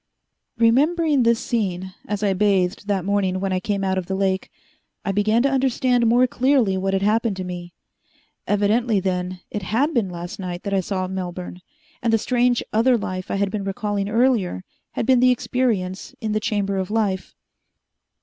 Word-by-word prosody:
Remembering 290 +6 +3
this 235 -1 +3
scene, 190 -5 -2
as 210 0 -2
I 200 -2 +2
bathed 195 0 +1
that 195 -3 0
morning 195 -2 0
when 195 0 -1
I 185 - +1
came 200 +1 -2
out 190 -1 +1
of 180 - -7
the 190 - -2
lake, 190 -1 0 0.6
I 200 - +1
began 215 +4 +2
to 275 - +2
understand 255 -2 +2
more 245 +3 +5
clearly 255 -5 +2
what 195 +1 -1
had 190 - 0
happened 220 0 +2
to 185 - -3
me. 175 -1 -7 0.7
Evidently, 210 +2 +2
then, 180 -1 -2
it 210 - -3
had 250 - 0
been 225 -7 +1
last 175 +1 -7
night 180 -2 -5
that 200 - -3
I 195 - +3
saw 185 0 -2
Melbourne, 180 -1 -6 0.4
and 230 - +1
the 225 - +4
strange 245 +1 +1
other 240 +3 +4
life 185 -2 -5
I - - -1
had 200 0 0
been 210 -2 -3
recalling 200 0 -2
earlier 225 - +1 0.3
had - - -2
been 255 0 +4
the 255 +1 +5
experience 225 -7 -1
in 220 -1 -3
the 215 - +1
Chamber 205 -3 -1
of 190 -1 -2
Life. 205 -4 -1
205 Hz, 185 wpm, -22 LUFS, 190-235 Hz, 0.7 s, more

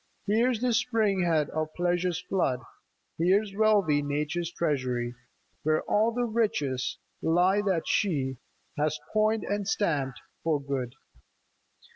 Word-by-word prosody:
Here 225 +5 +3
's 235 -2 -3
the 250 -1 +2
spring 220 -5 +2
head 155 -3 +1
of 155 0 -3
Pleasure's 175 0 0
flood! 135 -10 0 0.6
Here 190 +6 +4
's 195 -1 -10
wealthy 205 -9 +3
Nature's 150 +4 -2
treasury, 130 -8 -1 0.5
Where 155 0 +1
all 220 +2 +2
the 245 +1 0
riches 205 - 0 0.2
lie 180 +5 +3
that 190 -5 0
she 135 -9 0 0.4
Has 155 0 0
coined 215 0 +2
and 205 -1 -2
stamped 145 - 0 0.2
for 160 -3 +1
good. 135 -3 -4
175 Hz, 130 wpm, -28 LUFS, 145-210 Hz, 0.6 s, Here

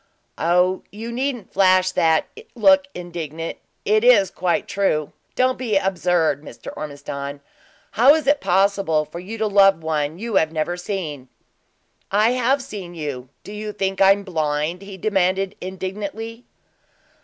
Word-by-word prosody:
"Oh, 180 +3 +2
you 225 +3 -7
needn't 245 -4 -3
flash 185 -1 +3
and 160 -1 +3 0.3
look 285 +4 +5
indignant; 165 -2 -6 0.3
it 215 +2 +3
is 210 -7 +5
quite 185 +3 -1
true! 155 -7 0 0.2
Don't 255 0 +1
be 225 -6 +1
absurd, 175 -6 +1
Mr. 155 - -10
Ormiston. 140 -1 -6 0.5
How 265 +6 +6
is 315 - -2
it 285 +1 +3
possible 190 -4 +2
for 160 +3 -9
you 205 +6 -7
to 220 - 0
love 195 -4 +4
one 155 0 -1
you 220 0 -1
have 160 -3 +2
never 160 +2 -2
seen?" 175 -8 -5 0.8
"I 210 +4 +3
have 255 +2 +1
seen 195 -9 -8
you. 140 -5 -5
Do - - -10
you 210 0 -5
think 195 -1 -2
I 195 0 +8
am 200 0 -6
blind?" 155 -1 -2
he 195 -1 -9
demanded, 195 0 0
indignantly. 200 +5 -6
190 Hz, 145 wpm, -21 LUFS, 165-215 Hz, 0.8 s, I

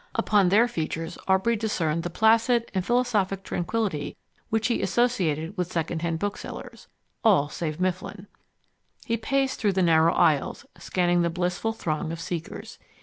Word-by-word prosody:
Upon 205 -4 +3
their 220 +6 +5
features 165 -5 -4
Aubrey 190 +5 +3
discerned 170 -7 -1
the 175 - -4
placid 230 +5 +3
and 190 -2 0
philosophic 210 -5 +1
tranquillity 185 -3 -2 0.3
which 225 0 0
he 240 - +1
associated 185 -8 0
with 180 -2 -3
second 165 0 -2
hand 165 -1 -1
booksellers 205 +4 -6 0.4
all 180 -10 +4
save 155 0 -4
Mifflin. 185 +2 -3 0.8
He 230 -3 0
paced 270 +4 0
through 205 -4 +1
the 190 0 +2
narrow 165 -1 +4
aisles, 145 -3 +2
scanning 175 -1 +1
the 170 - +1
blissful 180 +5 -1
throng 160 -7 -3
of 165 - -5
seekers. 165 0 -6
185 Hz, 145 wpm, -26 LUFS, 165-225 Hz, 0.8 s, their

